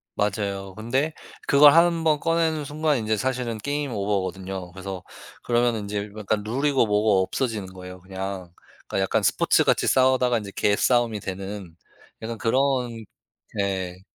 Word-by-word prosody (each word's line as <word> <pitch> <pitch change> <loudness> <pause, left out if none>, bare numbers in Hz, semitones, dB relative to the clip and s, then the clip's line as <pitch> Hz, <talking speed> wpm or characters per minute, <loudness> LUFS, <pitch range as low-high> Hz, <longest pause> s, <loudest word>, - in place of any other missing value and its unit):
맞아요. 100 -2 -2
근데 130 +9 -1 0.3
그걸 145 0 +8
한번 165 -2 +4
꺼내는 165 -1 0
순간 150 +1 0
인제 110 -1 0
사실은 125 0 -2
게임 145 +4 -3
오버 100 -1 0
거든요. 95 -1 -6
그래서 95 -1 -7 0.4
그러면은 120 -2 +1
인제 105 0 -4
약간 105 0 -1
룰이고 135 +4 +1
뭐고 105 -2 +3
없어지는 110 -1 -2
거예요 90 0 -10
그냥. 95 -1 -6 0.4
그러니까 - - -2
약간 95 - +1
스포츠 - - +3
같이 - - +2
싸우다가 130 -2 +3
이제 100 -2 -8
개싸움이 115 +1 +2
되는 95 -2 -6 0.5
약간 115 +1 -5
그런 125 -1 0 0.5
예. 95 -2 -2
110 Hz, 335 characters per minute, -24 LUFS, 95-130 Hz, 0.5 s, 그걸